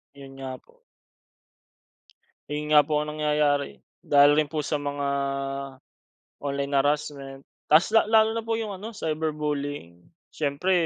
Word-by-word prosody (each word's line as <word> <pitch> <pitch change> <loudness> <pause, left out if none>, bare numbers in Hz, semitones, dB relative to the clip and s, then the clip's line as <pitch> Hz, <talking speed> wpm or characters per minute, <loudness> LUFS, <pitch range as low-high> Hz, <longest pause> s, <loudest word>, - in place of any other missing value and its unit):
Iyon 135 -1 -12
nga 130 -1 -7
po. - - -28 1.7
Eh, 150 - -2
yun 150 0 -2
nga 150 - +9
po 150 0 0
ang 150 0 -5
nangyayari. 150 -2 +1 0.2
Dahil 145 0 +5
rin 150 -1 +2
po 155 -2 -3
sa 150 -2 -1
mga 145 0 -3 1.3
online 140 0 -3
harassment. 140 -1 -2 0.3
Tapos 160 +7 +5
la 225 - +5
lalo 220 0 +4
na 225 - -3
po 225 0 -1
yung 220 -2 -4
ano 205 +4 -7
cyberbullying. 150 - -3 0.3
Siyempre, 150 +5 -1
150 Hz, 140 wpm, -25 LUFS, 140-155 Hz, 1.7 s, nga